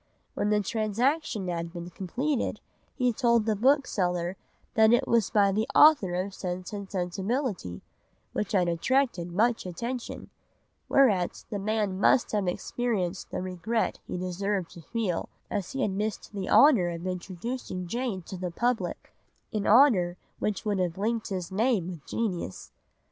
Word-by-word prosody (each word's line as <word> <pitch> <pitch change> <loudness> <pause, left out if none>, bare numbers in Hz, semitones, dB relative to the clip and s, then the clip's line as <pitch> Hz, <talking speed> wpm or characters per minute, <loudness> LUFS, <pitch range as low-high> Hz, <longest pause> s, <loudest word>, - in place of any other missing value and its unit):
When 205 - 0
the 210 0 +3
transaction 220 - 0
had 170 -1 -3
been 175 0 -7
completed 255 - -2 0.4
he 250 -3 +1
told 235 -2 +3
the 220 -1 +1
bookseller 195 - +1 0.4
that 220 0 +5
it 240 +2 +3
was 230 -4 +3
by 200 -2 +4
the 215 +3 0
author 285 - +6
of 190 +2 -2
Sense 185 +1 -5
and 200 -2 -6
Sensibility, 190 - -2 0.5
which 210 - -2
had 180 -3 +3
attracted 175 0 +1
much 230 +6 +2
attention, 235 +7 -5 0.6
whereat 205 -10 +3
the 205 - -2
man 205 -2 -1
must 240 - +4
have 205 -3 0
experienced 195 -1 -2
the - - -3
regret 185 +5 -1
he - - -4
deserved 185 +1 -2
to 170 - -11
feel, 195 -2 -2 0.2
as 200 +2 -3
he 270 0 -1
had 205 - +1
missed 210 +2 -3
the 195 -2 -4
honour 245 -12 +6
of 170 +1 -5
introducing 185 +2 -4
Jane 230 -1 -3
to 190 - -7
the 180 0 -3
public, 240 +7 -2 0.4
an 210 -2 -1
honour 205 -8 +5 0.2
that 210 0 -2
would 205 -2 0
have 180 -2 -1
linked 225 +2 -1
his 185 -2 -4
name 215 -3 +1
with 170 -5 -7
genius. 185 - -3
200 Hz, 155 wpm, -28 LUFS, 180-235 Hz, 0.6 s, author